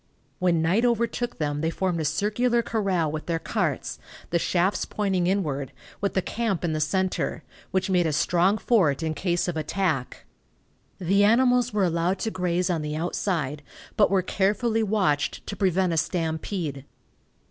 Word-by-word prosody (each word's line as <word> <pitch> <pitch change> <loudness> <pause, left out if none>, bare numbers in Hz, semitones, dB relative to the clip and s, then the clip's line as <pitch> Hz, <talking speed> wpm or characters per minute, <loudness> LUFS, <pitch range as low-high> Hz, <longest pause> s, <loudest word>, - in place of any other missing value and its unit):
When 170 -3 +2
night 185 +8 +2
overtook 235 0 0
them 145 -2 -2
they 160 - +1
formed 180 0 -1
a - - -2
circular 215 +9 +1
corral 190 -9 0
with 155 0 -5
their 165 -1 0
carts, - - -2 0.3
the 170 - +2
shafts 180 +4 +1
pointing 190 -4 0
inward, 150 -9 -1 0.3
with 200 - -1
the 190 - +1
camp 220 -6 -1
in 160 - 0
the 155 - -1
center, 185 +5 -1 0.3
which 190 0 0
made 180 -3 +2
a - - 0
strong 180 +6 +2
fort 170 - +2
in 160 -1 -1
case 175 +2 -1
of 175 - -2
attack. 155 -4 -2 0.7
The 195 +3 +2
animals 245 +2 +4
were 210 -2 +1
allowed 170 +2 0
to 225 - -1
graze 180 -1 0
on 165 -3 -1
the 150 0 -3
outside, 160 -3 -2 0.3
but 205 - +4
were 195 -2 +2
carefully 215 +5 +1
watched 190 -10 0
to 200 - -5
prevent 185 -2 +1
a - - -1
stampede. 160 -3 -2
180 Hz, 165 wpm, -25 LUFS, 160-205 Hz, 0.7 s, animals